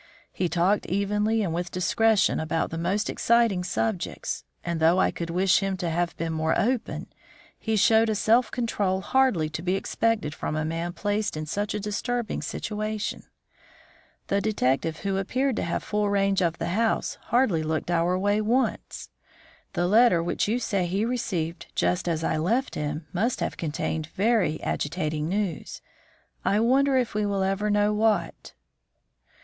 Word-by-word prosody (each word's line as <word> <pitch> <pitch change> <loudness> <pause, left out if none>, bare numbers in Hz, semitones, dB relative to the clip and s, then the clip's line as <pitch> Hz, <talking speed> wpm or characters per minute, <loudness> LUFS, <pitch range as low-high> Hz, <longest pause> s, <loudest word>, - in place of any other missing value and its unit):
He 180 - -1
talked 180 +5 +1
evenly 210 +3 +1
and 170 -4 -2
with 175 +1 -2
discretion 215 +4 +2
about 160 +1 -1
the 165 - -4
most 195 +5 0
exciting 230 -6 +2
subjects; 185 0 -2 0.2
and, 170 -1 -2
though 165 +3 +4
I 190 - +3
could 170 -1 -5
wish 185 +2 +3
him 195 -1 -2
to 175 -2 -2
have 170 +1 -1
been 165 -1 -2
more 160 0 +1
open, 245 +1 -1 0.5
he 220 0 -1
showed 220 +2 +4
a 215 - +1
self 230 +4 +3
control 205 -6 -1
hardly 255 -11 +2
to 160 +1 -5
be 180 +2 0
expected 210 -5 0
from 155 - -4
a 155 0 -1
man 165 +2 -3
placed 205 -2 -1
in 155 - -3
such 205 +7 -2
a - - -1
disturbing 220 +3 -2
situation. 215 0 -4 1.0
The 200 0 0
detective, 160 -6 0
who 195 -1 -1
appeared 255 +7 0
to - - -1
have 170 - -2
full 210 -1 0
range 195 -1 +2
of 170 -1 0
the 165 +1 -3
house, 220 +5 0
hardly 225 -9 +2
looked 155 +2 -2
our 175 +2 +2
way 205 +2 +1
once. 240 +5 -1 0.6
The 175 - 0
letter 205 -3 +5
which 175 - -1
you 225 +4 +1
say 200 -7 -1
he 195 +5 0
received 180 -9 -3
just 175 0 +1
as 160 -1 -1
I 160 - 0
left 230 - 0
him 150 +1 -3
must 225 +7 0
have - - -2
contained 155 0 -3
very 200 -5 +1
agitating 155 -1 -2
news. 195 -4 -3 0.6
I 205 - +2
wonder 265 +4 +3
if 250 -2 0
we 210 0 0
will 200 -1 0
ever 195 +2 0
know 205 0 +2
what." 215 0 0
195 Hz, 165 wpm, -26 LUFS, 170-215 Hz, 1.0 s, letter